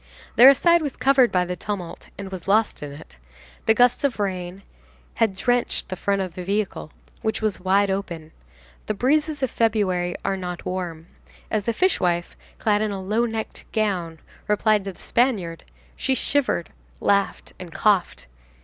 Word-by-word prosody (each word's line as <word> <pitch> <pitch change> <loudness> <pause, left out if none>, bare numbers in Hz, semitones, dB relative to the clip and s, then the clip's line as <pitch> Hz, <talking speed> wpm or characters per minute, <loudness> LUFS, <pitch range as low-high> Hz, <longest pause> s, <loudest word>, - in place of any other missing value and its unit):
Their 250 +4 +10
aside 340 +5 +5
was 290 -4 -4
covered 265 -2 +4
by 180 -1 +2
the 180 0 -3
tumult 180 -1 -6
and 195 -1 -7
was 185 -2 -7
lost 215 +2 +2
in 145 -1 -6
it. 140 - -13 0.5
The 220 - +5
gusts 245 +3 +4
of 280 -4 +1
rain 185 -1 -3 0.5
had 220 -4 +1
drenched 245 +5 0
the 185 - -3
front 200 +1 0
of 185 -3 -6
the 180 - -6
vehicle, 200 -4 -2 0.3
which 220 0 -1
was 215 -2 0
wide 195 +2 +2
open; 170 -5 -4 0.6
the 215 - -1
breezes 295 +5 +1
of 260 - 0
February 190 -6 +1
are 195 - 0
not 180 -2 -6
warm; 175 -3 -4 0.5
as 215 -2 0
the 235 - +1
fishwife, 180 - +1 0.2
clad 210 -1 +1
in 215 - 0
a 200 -1 -4
low 215 +5 0
necked 225 -1 -6
gown, 185 -7 -1 0.3
replied 210 -1 +2
to 195 - -4
the - - -22
Spaniard, 205 -10 0 0.3
she 265 - 0
shivered, 260 -12 0 0.3
laughed 200 0 0
and 180 -2 -9
coughed. 180 - +1
200 Hz, 165 wpm, -23 LUFS, 180-225 Hz, 0.6 s, Their